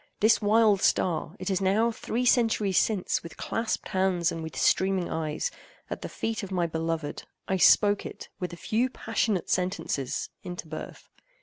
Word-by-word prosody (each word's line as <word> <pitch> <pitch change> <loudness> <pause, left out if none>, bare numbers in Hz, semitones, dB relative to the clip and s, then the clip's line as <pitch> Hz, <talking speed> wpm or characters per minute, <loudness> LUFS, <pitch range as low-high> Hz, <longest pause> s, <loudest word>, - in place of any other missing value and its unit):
This 220 +2 +4
wild 210 -1 +4
star—it 175 +3 0
is 190 0 0
now 210 +5 +3
three 235 +2 -2
centuries 220 -6 +3
since, 205 -5 0
with 170 - -11
clasped 225 -1 -2
hands, 185 -4 +1
and 165 - -5
with 160 -4 -7
streaming 190 -2 +2
eyes, 160 - -2 0.4
at - - -4
the - - -5
feet 225 0 -3
of 195 -2 -7
my 180 -2 +1
beloved—I 165 +3 -3
spoke 205 +2 +5
it—with 180 -2 -7
a 175 - -8
few 235 +8 0
passionate 220 -5 -1
sentences—into 180 -1 -3
birth. 155 0 -8
190 Hz, 145 wpm, -27 LUFS, 170-220 Hz, 0.4 s, spoke